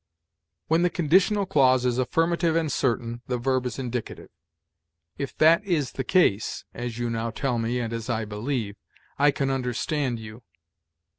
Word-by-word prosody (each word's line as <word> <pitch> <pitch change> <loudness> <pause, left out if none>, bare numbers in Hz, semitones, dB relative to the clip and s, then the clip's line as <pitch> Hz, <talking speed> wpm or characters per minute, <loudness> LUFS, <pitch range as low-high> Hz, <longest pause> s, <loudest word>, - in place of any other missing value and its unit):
"When 165 +2 +3
the 180 - +3
conditional 190 +5 +2
clause 130 -8 +3
is 125 0 +1
affirmative 165 +5 +1
and 160 -3 +1
certain, 120 -2 -1
the 125 - -1
verb 130 +1 0
is 120 - -6
indicative: 125 -3 -5 0.9
'If 140 -2 -5
that 165 +5 +5
is 165 -9 0
the 135 - -4
case' 120 - +1
(as 120 -1 -5
you 120 0 -1
now 115 0 -2
tell 120 +1 -2
me, 115 +2 -1
and 115 -1 -3
as 115 +1 -5
I 110 -2 -1
believe), 105 0 -3 0.4
'I 145 +1 +5
can 135 -1 0
understand 130 +1 -1
you.' 110 +1 -10
130 Hz, 160 wpm, -25 LUFS, 115-155 Hz, 0.9 s, that